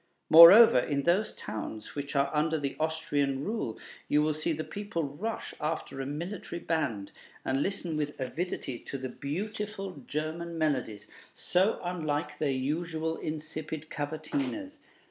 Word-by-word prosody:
Moreover, 170 - +11
in 140 +2 -1
those 190 +7 +2
towns 110 0 -6
which 140 0 -5
are 140 0 +2
under 155 +1 +2
the 140 -2 -3
Austrian 145 -4 0
rule, 205 - -3 0.3
you 150 +1 +3
will 155 0 +1
see 155 +2 -1
the 155 0 -2
people 205 -4 -4
rush 155 +11 -4
after 150 -3 -3
a 135 - -4
military 170 +5 -5
band, 130 -13 -2 0.3
and 135 +1 +1
listen 175 -3 -2
with 150 -1 -3
avidity 135 -2 -3
to 140 - -6
the 130 -1 -5
beautiful 195 - -5
German 165 +3 -3
melodies, 130 -9 -1 0.3
so 190 +4 +2
unlike 160 -4 -2
their 150 - +1
usual 160 +4 -1
insipid 155 0 -5
cavatinas. 270 - -3
155 Hz, 140 wpm, -30 LUFS, 140-175 Hz, 0.3 s, Moreover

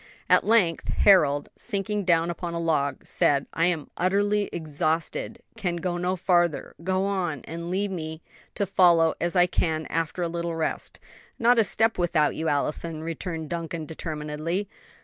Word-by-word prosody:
At - - +6
length 200 -7 +2
Harold, 145 -8 +4
sinking 205 -2 -2
down 170 -1 +3
upon 170 0 -5
a - - -2
log, 145 -5 0
said, 140 -1 +2
"I 165 - +2
am 170 -4 -1
utterly 205 +3 +1
exhausted! 160 +7 -2
Can 175 -3 -2
go 175 0 -2
no 180 +1 0
farther. 175 -3 +1
Go 185 +2 0
on, 180 -8 -2
and 170 +1 -6
leave 195 +2 -1
me 160 -2 -5 0.3
to 200 - 0
follow 170 -4 +4
as 175 +2 -1
I 180 -1 +6
can 160 -3 -1
after 165 +2 -1
a - - 0
little 170 0 -3
rest." 160 -1 -3 0.4
"Not 235 +1 +4
a - - +6
step 225 0 +1
without 165 -4 +2
you, 160 - -2
Allison," 155 +2 -1
returned 165 -1 -5
Duncan, 165 -1 -4
determinedly. 155 +4 -4
170 Hz, 160 wpm, -26 LUFS, 160-185 Hz, 0.4 s, At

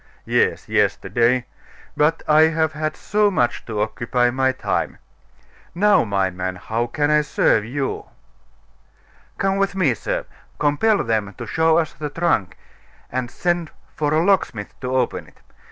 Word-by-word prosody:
"Yes, - - +1
yesterday; 120 +1 +1 0.5
but 155 +2 +1
I 155 +1 +6
have 160 -1 0
had 155 0 -3
so 210 0 +2
much 120 -11 0
to 105 -3 -2
occupy 120 +3 0
my 130 +1 +2
time. - - -2 0.8
Now, 205 +3 +4
my 100 -2 0
man, 90 +1 -4
how 115 +6 -2
can 145 +4 0
I 150 0 +4
serve 115 -6 +2
you?" 135 +3 -3 1.3
"Come 195 0 0
with 195 0 0
me, 170 -10 +2
sir; - - -3 0.3
compel 150 +9 +2
them 105 -3 -1
to 120 - -6
show 160 +8 +2
us 160 -2 0
the 150 -1 -5
trunk, 145 - 0 0.5
and 125 -1 -2
send 175 +2 -1 0.3
for 150 -1 0
a 155 +2 +3
locksmith 155 - 0
to 125 -1 -4
open 125 -2 -1
it. - - -21
145 Hz, 150 wpm, -21 LUFS, 115-165 Hz, 1.3 s, I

